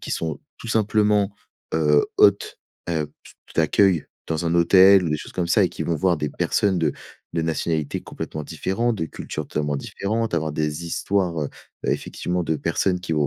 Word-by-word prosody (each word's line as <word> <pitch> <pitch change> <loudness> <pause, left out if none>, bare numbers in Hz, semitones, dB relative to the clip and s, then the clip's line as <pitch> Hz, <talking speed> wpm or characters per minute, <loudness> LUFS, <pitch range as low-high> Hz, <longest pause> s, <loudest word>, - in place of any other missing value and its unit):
qui - - -7
sont 80 -2 -2 0.2
tout - - -9
simplement, 105 -2 +2 0.4
heu, 75 -2 +4
hôtes, 100 0 +4 0.3
heu, 80 -3 0
t 75 - -25
t - - -19
d'accueil 85 +1 +3 0.2
dans 80 +1 -2
un 85 - +1
hôtel 95 +2 +7
ou 80 - -1
des 75 - +1
choses - - -9
comme 90 -2 -1
ça - - +4
et - - +3
qui - - -5
vont 85 - 0
voir 90 +1 +2
des 75 -1 -2
personnes 95 -3 +1
de 80 -3 +1 0.4
de 85 - +1
nationalités 80 -2 -1
complètement 75 - -6
différentes, 115 +9 -1
de 80 - -1
cultures 75 -1 -6
totalement 75 -1 -1
différentes, 110 +9 -2
avoir 80 -2 -1
des 75 +2 -2
histoires, 90 -2 0
heu, 70 - -2 0.4
effectivement, 90 0 -1
de 80 -1 0
personnes 90 +5 0
qui 90 -3 -4
vont 75 -2 +2
85 Hz, 190 wpm, -23 LUFS, 75-95 Hz, 0.4 s, hôtel